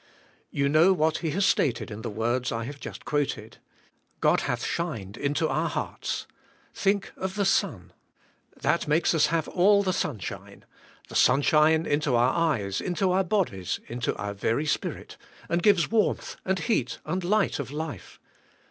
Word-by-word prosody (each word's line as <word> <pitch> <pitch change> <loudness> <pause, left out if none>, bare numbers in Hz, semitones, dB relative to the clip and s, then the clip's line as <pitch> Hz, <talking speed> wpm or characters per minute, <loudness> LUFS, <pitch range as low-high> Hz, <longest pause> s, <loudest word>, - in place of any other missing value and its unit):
You 140 -1 0
know 160 +6 +5
what 160 -2 +1
he 165 - -2
has 190 +6 +1
stated 120 -9 +1
in 105 +1 -6
the - - -4
words 120 +4 -1
I 115 0 -2
have 140 +4 -7
just - - -8
quoted. 145 -2 -2 0.6
God - - +3
hath - - -2
shined 115 - -3
into 145 +3 0
our 155 +4 0
hearts. - - -3 0.5
Think 200 0 0
of 190 +1 -4
the 205 -1 +1
sun. 180 - 0 0.7
That - - 0
makes 155 +4 +2
us 155 -3 +4
have 160 0 0
all 200 +2 +4
the 185 -1 0
sunshine; 115 - -5 0.4
the - - -12
sunshine 155 +5 +4
into 145 -3 +1
our 120 +2 +3
eyes, 120 - 0
into 185 +1 0
our 190 +1 +3
bodies, 170 - -1
into 120 0 -2
our 105 0 -4
very 115 +8 -1
spirit, 150 - -3 0.3
and 170 +1 0
gives 200 -2 +3
warmth 220 -2 0
and 190 0 +1
heat 130 - -1
and 180 +4 -2
light 205 0 +1
of 140 - -4
life. 150 - -6
155 Hz, 165 wpm, -26 LUFS, 125-185 Hz, 0.7 s, know